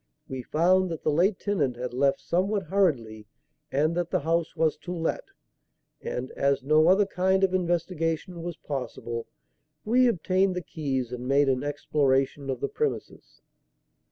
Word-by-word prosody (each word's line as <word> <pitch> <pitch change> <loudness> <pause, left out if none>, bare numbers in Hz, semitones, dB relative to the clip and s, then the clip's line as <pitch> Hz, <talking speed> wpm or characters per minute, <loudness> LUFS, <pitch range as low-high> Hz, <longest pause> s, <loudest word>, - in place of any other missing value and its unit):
We 130 -1 -5
found 180 +7 +2
that 165 -2 -5
the 155 - +2
late 185 +6 +2
tenant 150 - -1
had 125 +1 -5
left 135 +2 +1
somewhat 190 +7 0
hurriedly 135 - 0 0.4
and 150 +4 +2
that 175 0 -1
the - - 0
house 165 +2 0
was 160 -2 +2
to 180 - -8
let; 165 -2 -2 0.8
and, 125 +1 -4
as 140 -1 0
no 155 +3 +4
other 195 +3 +5
kind 190 0 +1
of 190 -1 +3
investigation 170 -1 -1
was 170 0 -5
possible, 120 -4 -5 0.6
we 250 +3 +4
obtained 190 -2 +1
the 180 - -3
keys 135 -7 -3
and 125 0 -5
made 140 +1 +3
an 130 0 0
exploration 140 -1 0
of 130 -2 -3
the - - 0
premises." 450 - -4
160 Hz, 155 wpm, -27 LUFS, 135-185 Hz, 0.8 s, other